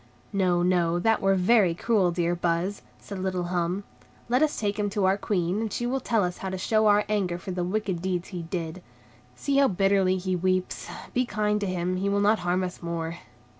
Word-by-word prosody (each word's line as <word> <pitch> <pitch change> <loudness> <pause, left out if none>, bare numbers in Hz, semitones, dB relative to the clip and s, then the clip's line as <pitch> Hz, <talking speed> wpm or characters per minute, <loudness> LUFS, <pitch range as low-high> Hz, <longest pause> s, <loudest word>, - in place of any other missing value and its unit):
"No, 180 -3 +2
no, 175 -2 +2
that 225 +5 +2
were 195 0 +3
very 185 -2 +4
cruel, 200 -1 +2
dear 175 0 0
Buzz," 175 +3 -1 0.2
said 200 -2 -8
little 185 -1 -1
Hum; 175 +2 -1 0.5
"let 250 +3 +3
us 310 -1 +1
take 205 -1 -1
him 205 0 +1
to 200 -1 0
our 190 +1 +4
Queen, 195 -1 -1
and 220 -2 -3
she 240 - -2
will 260 +2 0
tell 230 -4 +1
us 180 0 -3
how 190 - -4
to 190 - -3
show 215 +3 +2
our 205 0 +4
anger 195 -5 0
for 180 +2 -7
the 180 -1 -2
wicked 190 -2 -2
deeds 180 -1 -2
he 180 -3 -5
did. 165 +1 -5 0.5
See 275 - 0
how 280 -1 +6
bitterly 195 -1 +2
he 185 0 -1
weeps; 185 +1 -1 0.3
be 250 - +2
kind 210 -1 0
to 200 - -1
him, 185 0 -1
he 195 +2 0
will 200 0 +1
not 210 +2 +3
harm 180 +1 0
us 180 0 -5
more." 170 0 -4
185 Hz, 215 wpm, -26 LUFS, 175-205 Hz, 0.5 s, how